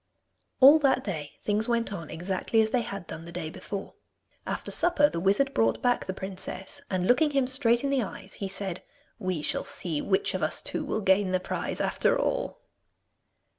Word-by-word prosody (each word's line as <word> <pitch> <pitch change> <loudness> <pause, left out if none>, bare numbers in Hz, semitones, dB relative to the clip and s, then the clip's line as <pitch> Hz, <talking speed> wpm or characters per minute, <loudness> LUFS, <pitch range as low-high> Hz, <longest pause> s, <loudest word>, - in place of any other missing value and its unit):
All 285 +4 +9
that 270 -3 +2
day 155 -7 -5
things 215 +3 0
went 230 -3 0
on 165 -6 -6
exactly 185 +6 -1
as 220 0 +3
they 250 - +2
had 200 -5 -6
done 165 0 -8
the 170 - -9
day 170 -2 -5
before. 200 +3 -6 0.5
After - - -3
supper 325 -3 +4
the 170 - -3
wizard 200 +10 +2
brought 115 0 +2
back 245 -1 +2
the - - -1
princess, 190 0 -5
and 185 -2 0
looking 275 - +4
him 275 -2 +2
straight 250 -2 +2
in 280 - 0
the 270 -2 +2
eyes 190 -2 -7
he 195 - -1
said, 190 -2 -3 0.4
'We 185 -5 -2
shall - - 0
see 160 -5 -3
which 190 - +1
of - - -2
us - - 0
two - - -2
will 220 - -2
gain 190 -1 +3
the 185 - +3
prize 185 - -4
after - - +2
all! - - -1
200 Hz, 195 wpm, -28 LUFS, 185-250 Hz, 0.5 s, All